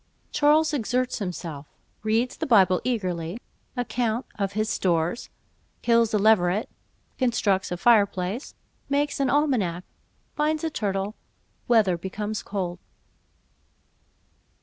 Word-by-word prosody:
Charles 305 Hz, +1 st, +3 dB
exerts 250 Hz, -1 st, -1 dB
himself—Reads 195 Hz, -, -4 dB
the -, -, -3 dB
Bible 190 Hz, -7 st, +5 dB
eagerly—Account 225 Hz, +4 st, -3 dB
of 200 Hz, -1 st, -2 dB
his 215 Hz, +1 st, 0 dB
Stores—Kills 210 Hz, +5 st, -1 dB
a 215 Hz, -, +2 dB
Leveret—Constructs 205 Hz, +1 st, 0 dB
a 180 Hz, -, -2 dB
Fire 215 Hz, +1 st, +5 dB
place—Makes 270 Hz, +9 st, -4 dB
an 275 Hz, -2 st, +2 dB
Almanack—Finds 285 Hz, -, -1 dB
a 325 Hz, -, -1 dB
Turtle—Weather 200 Hz, -, -1 dB
becomes 210 Hz, +4 st, -4 dB
cold. 185 Hz, -3 st, -4 dB
215 Hz, 80 wpm, -25 LUFS, 185-245 Hz, -, Bible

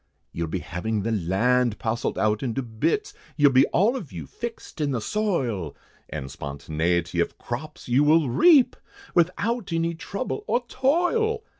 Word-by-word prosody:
You'll 85 Hz, 0 st, -3 dB
be 80 Hz, -, -2 dB
having 105 Hz, +4 st, -2 dB
the 115 Hz, -, -1 dB
land 110 Hz, +5 st, +1 dB
parcelled 115 Hz, 0 st, -2 dB
out 105 Hz, 0 st, +1 dB
into 130 Hz, +1 st, -2 dB
bits, 410 Hz, -, -1 dB, 0.2 s
You'll 145 Hz, -2 st, +6 dB
be 130 Hz, +1 st, +5 dB
all 220 Hz, +8 st, +2 dB
of 185 Hz, -, -6 dB
you 85 Hz, -5 st, -6 dB
fixed 230 Hz, -, -7 dB
in 145 Hz, -, +1 dB
the 130 Hz, -4 st, -1 dB
soil, 120 Hz, -, -1 dB, 0.3 s
And 65 Hz, -, -5 dB
spontaniety 80 Hz, +5 st, -2 dB
of -, -, -2 dB
crops 125 Hz, +6 st, -6 dB
you 125 Hz, +4 st, +4 dB
will 155 Hz, 0 st, +4 dB
reap, 280 Hz, -, +5 dB, 0.4 s
Without 195 Hz, +6 st, +1 dB
any 165 Hz, 0 st, 0 dB
trouble 200 Hz, -, -4 dB
or 245 Hz, 0 st, +1 dB
toil. 360 Hz, -, +1 dB
130 Hz, 155 wpm, -25 LUFS, -, 0.4 s, You'll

